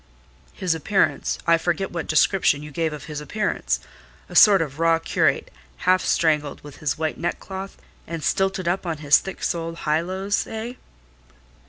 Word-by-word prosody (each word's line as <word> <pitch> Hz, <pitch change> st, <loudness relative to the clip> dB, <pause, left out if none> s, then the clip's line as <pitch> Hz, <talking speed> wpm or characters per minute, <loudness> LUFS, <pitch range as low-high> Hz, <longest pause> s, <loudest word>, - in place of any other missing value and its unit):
"His 185 Hz, -4 st, 0 dB
appearance,—I 170 Hz, -1 st, +1 dB
forget 175 Hz, +3 st, -1 dB
what 170 Hz, -2 st, -4 dB
description 155 Hz, -1 st, +3 dB
you 150 Hz, -, -9 dB
gave 160 Hz, +1 st, -1 dB
of 150 Hz, -2 st, -7 dB
his 150 Hz, 0 st, -6 dB
appearance;—a 210 Hz, +8 st, -4 dB
sort 205 Hz, -2 st, +8 dB
of 145 Hz, -1 st, -8 dB
raw 165 Hz, 0 st, +4 dB
curate, 165 Hz, -, 0 dB, 0.3 s
half 185 Hz, +1 st, +4 dB
strangled 150 Hz, -3 st, +1 dB
with 145 Hz, -1 st, -11 dB
his 150 Hz, -, -2 dB
white 155 Hz, 0 st, -2 dB
neckcloth, 190 Hz, +3 st, -5 dB, 0.3 s
and 165 Hz, -2 st, -5 dB
stilted 190 Hz, -2 st, 0 dB
up 180 Hz, +1 st, -1 dB
on 165 Hz, -2 st, -2 dB
his 145 Hz, -, +7 dB
thick 190 Hz, -, -8 dB
soled 165 Hz, -1 st, -2 dB
high 155 Hz, +1 st, +2 dB
lows, 190 Hz, +3 st, -2 dB
eh?" 225 Hz, +2 st, -5 dB
165 Hz, 155 wpm, -23 LUFS, 155-190 Hz, 0.3 s, sort